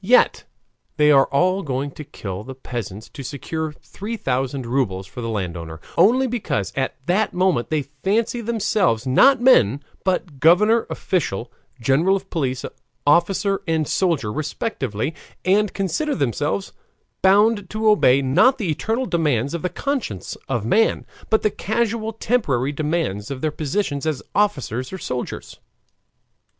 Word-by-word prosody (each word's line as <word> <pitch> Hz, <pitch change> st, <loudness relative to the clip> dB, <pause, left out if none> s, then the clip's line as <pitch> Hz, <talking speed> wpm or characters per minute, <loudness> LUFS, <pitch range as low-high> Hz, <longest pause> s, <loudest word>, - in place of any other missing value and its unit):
Yet 245 Hz, +6 st, +4 dB, 0.5 s
they 150 Hz, 0 st, +5 dB
are 135 Hz, -2 st, +6 dB
all 185 Hz, +7 st, +2 dB
going 140 Hz, -2 st, -3 dB
to 150 Hz, -, -9 dB
kill 100 Hz, -9 st, -7 dB
the 130 Hz, +3 st, -8 dB
peasants 110 Hz, -5 st, -6 dB
to -, -, -9 dB
secure 155 Hz, +4 st, -4 dB
three 205 Hz, +8 st, -7 dB
thousand 130 Hz, -, -2 dB
rubles 115 Hz, -7 st, -1 dB
for 110 Hz, +6 st, -9 dB
the 115 Hz, -, -3 dB
landowner, 85 Hz, -6 st, -4 dB, 0.2 s
only 255 Hz, +6 st, +5 dB
because 225 Hz, -, -2 dB
at 135 Hz, -1 st, -1 dB
that 195 Hz, +5 st, +1 dB
moment 180 Hz, -9 st, +1 dB
they 155 Hz, -2 st, 0 dB, 0.2 s
fancy 230 Hz, +4 st, +1 dB
themselves 210 Hz, -, +1 dB
not 260 Hz, -, +5 dB
men 140 Hz, -, +4 dB, 0.2 s
but 180 Hz, -6 st, -1 dB
governor, 210 Hz, -, +4 dB
official, 125 Hz, -, -2 dB, 0.3 s
general 140 Hz, +11 st, +3 dB
of 195 Hz, 0 st, -6 dB
police, 130 Hz, -6 st, -2 dB, 0.4 s
officer, 190 Hz, +6 st, +2 dB
and 160 Hz, -2 st, +1 dB
soldier, 160 Hz, -, 0 dB
respectively, 150 Hz, -, -3 dB, 0.3 s
and 200 Hz, +2 st, +3 dB
consider 195 Hz, -, -1 dB
themselves 145 Hz, -, -1 dB, 0.5 s
bound 205 Hz, +1 st, +4 dB
to 220 Hz, +1 st, -1 dB
obey, 140 Hz, -11 st, +5 dB
not 250 Hz, -, +4 dB
the 195 Hz, -10 st, -1 dB
eternal 225 Hz, -, -1 dB
demands 145 Hz, -, 0 dB
of 170 Hz, -, -3 dB
the 180 Hz, -, -1 dB
conscience 230 Hz, -, -3 dB
of 120 Hz, -5 st, -1 dB
man, 225 Hz, -, +2 dB, 0.2 s
but 220 Hz, -, +2 dB
the 215 Hz, -, +2 dB
casual, 225 Hz, +1 st, -1 dB
temporary 150 Hz, -, 0 dB
demands 150 Hz, -, -2 dB
of 135 Hz, -2 st, -5 dB
their 155 Hz, -, 0 dB
positions 150 Hz, -1 st, -2 dB
as 155 Hz, -4 st, -2 dB
officers 135 Hz, -, 0 dB
or 190 Hz, -, -5 dB
soldiers. 125 Hz, -8 st, -5 dB
155 Hz, 145 wpm, -22 LUFS, 130-205 Hz, 0.5 s, are